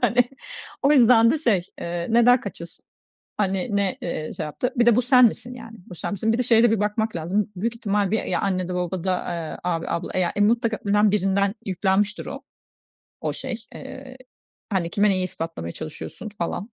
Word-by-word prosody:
hani. 245 0 +3 0.5
O 280 +1 +5
yüzden 235 -4 +6
de 310 - +1
şey, 225 - +2 0.2
eee, 170 0 -3
"Neden 240 +2 +5
kaçıyorsun, 170 -4 -9 0.5
hani, 195 +1 0
ne, 200 -2 0
eee, 155 -2 -4
şey - - -2
yaptı, 245 - -3
bir 235 - +3
de 235 -2 +6
bu 245 - +4
sen 250 0 +6
misin, 240 +2 -1
yani, 230 -2 -11
bu 180 - -9
sen 170 - -4
misin?" 220 +3 0
Bir 230 - +1
de 250 - +1
şeye 230 -1 +4
de 240 - +5
bir 225 - +1
bakmak 210 +1 -1
lazım, 185 +5 -1
büyük 225 +6 -2
ihtimal 205 -3 0
bir, 220 - +2
eee, - - -5
ya - - 0
annede, 185 -2 -1
babada, 180 +1 -1
eee, 170 -2 -4
abi, 170 -2 -2
abla, 170 - -3
eee, - - +1
ya, 175 - 0
mutlaka 225 +1 +2
önem 205 +1 +4
birinden 200 0 +1
yüklenmiştir 195 +2 0
o - - -6 0.8
o - - -2
şey. 260 -3 -4 0.2
Eee, 260 -1 -9 0.6
hani, 175 -4 0
"Kime 205 +3 +3
neyi 185 -1 +1
ispatlamaya 165 - -5
çalışıyorsun?" 155 +7 -7
falan, 200 +1 -4
205 Hz, 195 wpm, -23 LUFS, 180-230 Hz, 0.8 s, yüzden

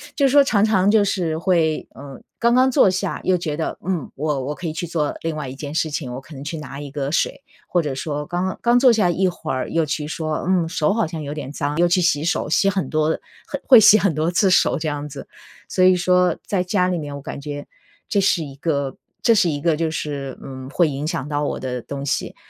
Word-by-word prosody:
就 280 - +2
是 265 - +3
说 285 - +7
常 210 -6 +2
常 200 -3 +3
就 215 -1 +5
是 170 -5 -1
会， 165 -3 +1
呃， 140 0 -10 0.2
刚 235 0 +3
刚 255 +1 +5
坐 260 -6 +5
下 190 0 -2
又 185 -1 +2
觉 155 -4 -3
得： 160 - -3
“嗯， 175 -7 -2
我 150 -1 -1
我 145 - -2
可 175 - -6
以 155 - -3
去 175 - -4
做 155 -3 -1
另 165 -1 -2
外 150 - -4
一 130 - -7
件 145 +1 -6
事 160 -1 0
情， 135 -5 -4
我 125 - -5
可 155 - -14
能 135 - -8
去 160 +2 -5
拿 140 -2 -8
一 145 - -8
个 140 -1 -3
水。” - - 0 0.3
或 175 - +1
者 145 -4 -3
说， 150 +1 -3
刚 180 +3 -2
刚 240 +1 +4
坐 255 -1 +6
下 210 -6 +3
一 185 +3 +1
会 165 -4 -4
儿 130 - -3
又 165 -1 +1
去 150 0 -3
说： 155 -1 -3
“嗯， 180 -3 +2
手 165 +1 +1
好 225 -7 0
像 160 -2 -6
有 145 0 -5
点 145 -3 -6
脏。” 145 +1 -3
又 175 - +5
去 180 +1 +2
洗 150 -3 +2
手， 165 - 0
洗 195 +4 +3
很 190 -2 -2
多 155 0 +1 0.4
很 285 - -4
会 250 -4 +9
洗 215 0 +8
很 195 -5 +1
多 155 +3 0
次 190 +2 +3
手 185 - +3
这 155 - -3
样 145 0 -4
子。 140 0 -8 0.4
所 185 - -1
以 185 0 +6
说 180 -1 +2
在 195 -3 0
家 180 0 +1
里 180 - 0
面 145 -3 -5
我 140 - -7
感 140 - -7
觉 145 0 -6 0.4
这 205 - +2
是 180 -4 +2
一 135 -2 -9
个 140 -3 -2 0.3
这 230 - +5
是 185 -5 +3
一 145 -2 -3
个 165 -1 +2
就 165 -1 0
是， 140 -4 -4
嗯， 130 -1 -8
会 160 +2 +2
影 140 +2 -4
响 140 -3 -3
到 145 0 -1
我 - - -2
的 125 -2 -4
东 140 +2 -6
西。 - - -2
160 Hz, 275 characters per minute, -21 LUFS, 145-185 Hz, 0.4 s, 会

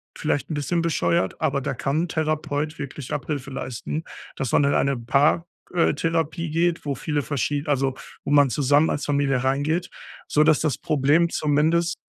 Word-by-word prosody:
vielleicht 140 +1 -1
'n - - -1
bisschen 165 +4 -1
bescheuert, 95 - 0
aber 140 0 +1
da - - -2
kann 140 +6 -1
'n - - -2
Therapeut 155 -1 -2
wirklich 140 -1 -7
Abhilfe 140 -1 -3
leisten, 135 +4 -4 0.3
dass 135 -4 -3
man 145 - +4
in 140 - +2
eine 140 -2 +1
Paar 145 +8 +2 0.3
äh, 170 - +3
Therapie 165 0 -1
geht, 170 0 0
wo 140 - -1
viele 145 +2 -2
verschie 145 +1 -1
also 135 -2 0 0.3
wo - - -5
man 145 -3 +5
zusammen 145 +3 +3
als 145 - -2
Familie 140 -3 +1
reingeht, 145 +6 0 0.4
sodass 155 0 +4
das 155 -3 0
Problem 155 +1 +2
zumindest 160 +4 +1
145 Hz, 170 wpm, -24 LUFS, 140-160 Hz, 0.4 s, man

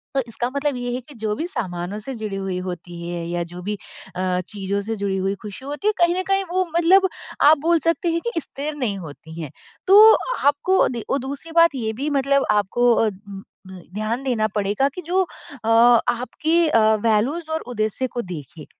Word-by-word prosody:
तो 270 - +3
इसका 240 +2 -2
मतलब 285 0 0
ये 245 0 -3
है 250 - -3
कि 290 - -12
जो 215 -2 -2
भी 325 - -3
सामानों 185 - -4
से 265 +5 -6
जुड़ी 215 -3 -5
हुई 195 -1 -3
होती 175 -1 -7
है 170 -1 -4
या 175 0 -1
जो 175 +1 -9
भी 205 +3 -3 0.4
अ, 185 0 0
चीज़ों 200 -1 -3
से 225 +2 -3
जुड़ी 200 -2 -2
हुई 195 +1 -1
खुशी 210 +5 -9
होती 295 +9 -3
है 430 - +4
कहीं 345 0 +3
न - - -1
कहीं 390 0 +2
वो 370 +1 +1
मतलब 380 +3 +5 0.3
आप 305 +2 +7
बोल 340 -1 +4
सकते 335 +2 0
हैं 335 0 -1
कि 335 - -1
स्थिर 295 +2 -5
नहीं 240 -9 -2
होती 160 0 -10
है। 150 -4 -6 0.4
तो 425 +3 +9 0.3
आपको 290 +7 +3
अदी 235 -3 -3 0.2
दूसरी 280 +5 -6
बात 335 -3 +5
ये 220 -4 -2
भी 275 +7 -3
मतलब 275 +1 +2
आपको 235 +4 +3
अ, 225 - +2
उ - - -1 0.6
द 185 -1 -10
ध्यान 215 +4 -2
देना 235 -5 +1
पड़ेगा 205 +6 +1
कि 360 - -5
जो 365 +3 +2
अ 280 -9 -9 0.4
आपकी 310 +8 +1
अ, 230 - +4 0.2
वैल्यूज़ 250 +10 +1
और 320 0 -1
उद्देश्य 225 +1 -2
को 240 - 0
देखे 160 - -9
240 Hz, 205 wpm, -22 LUFS, 200-305 Hz, 0.6 s, तो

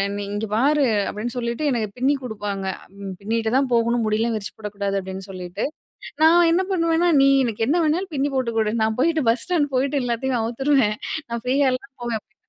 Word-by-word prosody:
நீ 205 - -3
இங்கே 215 +2 -2
பாரு 280 +5 +3 0.2
அப்படின்னு 230 +3 -4
சொல்லிட்டு 235 +4 -2
எனக்கு 225 -3 0
பின்னி 265 +3 +2
கொடுப்பாங்க. 205 -4 -4 0.6
பின்னிட்டு 220 +1 -1
தான் 270 -1 +2
போகணும் 235 0 +2
முடியலாம் 225 +2 +1
விரிச்சு 205 -3 -5
போடக்கூடாது 200 -2 -3
அப்படின்னு 190 0 -7
சொல்லிட்டு 180 -1 -5 0.6
நான் 335 +2 +6
என்ன 370 +3 +2
பண்ணுவேன்னா 335 -1 +2
நீ 275 - +6 0.2
எனக்கு 225 -2 -1
என்ன 340 +4 +3
வேணாலும் 340 +3 0
பின்னி 280 +1 0
போட்டு 250 -3 0
கொடு, 215 -1 +1
நான் 220 +1 0
போயிட்டு 320 +2 +2
பஸ் 235 - 0
ஸ்டாண்ட் 310 -6 0
போயிட்டு 275 +2 +1
எல்லாத்தையும் 245 +1 -1
அவுத்துருவேன் 240 -1 +1 0.3
நான் 235 0 -4
ஃப்ரீ 255 +2 +1
ஹேர்ல 255 -2 +1
தான் 275 0 -47
போவேன் 235 -2 -1
அப்படி 240 - -43
240 Hz, 185 wpm, -22 LUFS, 220-280 Hz, 0.6 s, நான்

